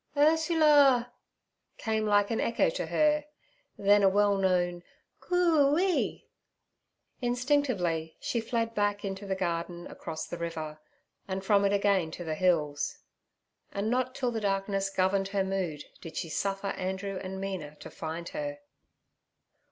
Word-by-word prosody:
'Ursula' 295 -5 +5 0.6
came 220 -1 -1
like 205 0 +3
an 225 - 0
echo 235 - +2
to - - -3
her, 300 -1 +2 0.5
then 205 +1 +4
a 195 - +6
well 205 +1 +3
known 180 -2 +1 0.4
'Coo 320 -5 +3
ee.' 370 0 0 0.9
Instinctively, 240 - 0
she 235 - -1
fled 230 0 -1
back 205 -1 0
into 195 +1 -5
the 190 - 0
garden 175 -1 -3
across 160 -2 -6
the 175 - -7
river, 160 -2 -5 0.5
and 190 0 -4
from 200 -1 +4
it 200 - +3
again 200 -4 +2
to 175 +2 -7
the 160 -2 -3
hills. 155 -4 +1 0.7
And 205 +3 -2
not 255 +1 0
till 250 -3 -1
the 225 -2 -3
darkness 195 -1 0
governed 195 0 +1
her 195 0 0
mood 185 -6 -2 0.2
did 165 - -8
she 165 - -3
suffer 195 +4 -2
Andrew 190 +1 -3
and 190 0 -5
Mina 190 -6 -5
to - - -11
find 165 +1 -5
her. 290 -1 -4
200 Hz, 145 wpm, -29 LUFS, 180-245 Hz, 0.9 s, a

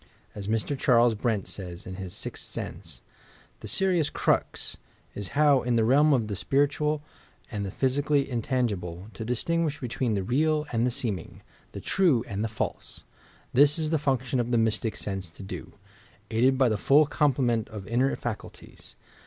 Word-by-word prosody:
As 100 -1 -6
Mr. 115 +6 0
Charles 120 -3 +4
Brent 110 -2 -1
says, 90 -3 -7
in 95 - -6
his 95 -2 -6
Sixth - - -5
Sense: - - -6 0.6
"The - - -8
serious 180 -6 +2
crux - - 0 0.4
is 100 -2 -5
how, 145 -3 +5
in 120 -1 0
the 115 - +3
realm 145 +6 +5
of 120 -6 +2
the 105 - -3
spiritual 145 +6 +1 0.5
and 105 -3 -3
the 100 - -3
physically 140 +5 +1
intan^ 120 -4 -1
ble, 90 +3 -8
to 110 - -6
distinguish 150 +6 -1
between 120 -2 -1
the 100 - -1
real 150 +7 +1
and 115 +1 +1
the - - +2
seeming, 110 -8 -4 0.3
the - - -6
true 160 -12 +2
and 105 -2 -3
the - - 0
false. 110 - -5 0.5
This 145 +4 +5
is 155 -1 -1
the 160 - +2
function 130 -2 0
of 120 0 0
the 120 - +2
Mystic 110 0 +1
Sense 95 -4 -4
to 80 - -11
do, 95 - -7 0.6
aided 125 +4 +3
by 130 -1 +4
the 110 -3 0
full 145 +7 +5
complement 125 -6 +1
of 105 -3 -8
inner 125 +6 +1
facnltiea. 120 -3 -8
120 Hz, 175 wpm, -27 LUFS, 110-145 Hz, 0.6 s, how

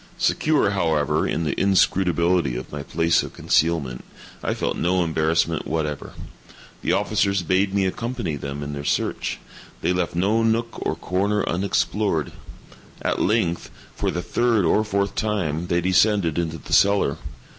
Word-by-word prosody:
Secure, 150 -10 +2
however, 80 -7 +1
in 80 - -1
the 75 -3 0
inscrutability 90 -6 +2
of 65 - -6
my 75 - -5
place 85 +3 +1
of - - -8
concealment, 75 -7 0 0.4
I - - -1
felt - - -2
no 90 +1 +1
embarrassment 80 0 0
whatever. 75 -3 -3 0.7
The - - 0
officers 100 -1 +1
bade 95 +3 +1
me 100 -1 +1
accompany 115 -3 -3
them 70 0 -5
in 70 0 -5
their 70 0 -5
search. - - -1 0.5
They 90 - +2
left 90 -2 -1
no 100 +6 +2
nook 115 +1 +1
or - - -1
corner 100 +3 -1
unexplored. 95 -2 0 0.7
At - - 0
length, 90 -5 0 0.3
for - - -1
the 90 - -3
third 115 -5 +1
or 105 +6 +3
fourth 100 -2 -1
time, 90 -7 -1
they 85 0 +1
descended 95 -2 +2
into 80 -1 -2
the - - -7
cellar. 100 0 +4
90 Hz, 150 wpm, -23 LUFS, 80-100 Hz, 0.7 s, cellar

